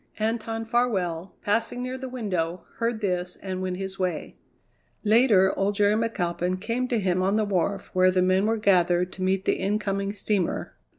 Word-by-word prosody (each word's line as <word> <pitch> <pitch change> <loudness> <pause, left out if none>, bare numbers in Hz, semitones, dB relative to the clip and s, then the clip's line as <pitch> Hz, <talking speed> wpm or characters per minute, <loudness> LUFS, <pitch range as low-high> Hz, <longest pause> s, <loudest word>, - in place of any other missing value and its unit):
Anton 225 +1 -2
Farwell, 195 -8 -1
passing 230 +4 0
near 255 +1 -3
the 260 0 -6
window, 185 -8 -2
heard 230 -1 -1
this 180 -2 -1
and 185 -1 -5
went 185 -1 -2
his 195 0 -6
way. 180 -4 -2 0.7
Later 215 -4 +5
old 200 +1 0
Jerry 205 0 +3
McAlpin 185 -5 -1
came 230 +5 -1
to 245 - 0
him 185 -2 +1
on 195 +2 +2
the 215 -1 +2
wharf 195 0 -1
where 185 0 +5
the 185 0 +2
men 185 +2 +3
were 225 +1 +1
gathered 180 -3 +3
to 190 - -9
meet 190 +1 +1
the - - +2
incoming 200 0 -1
steamer. 205 -3 -1
195 Hz, 175 wpm, -26 LUFS, 185-220 Hz, 0.7 s, Later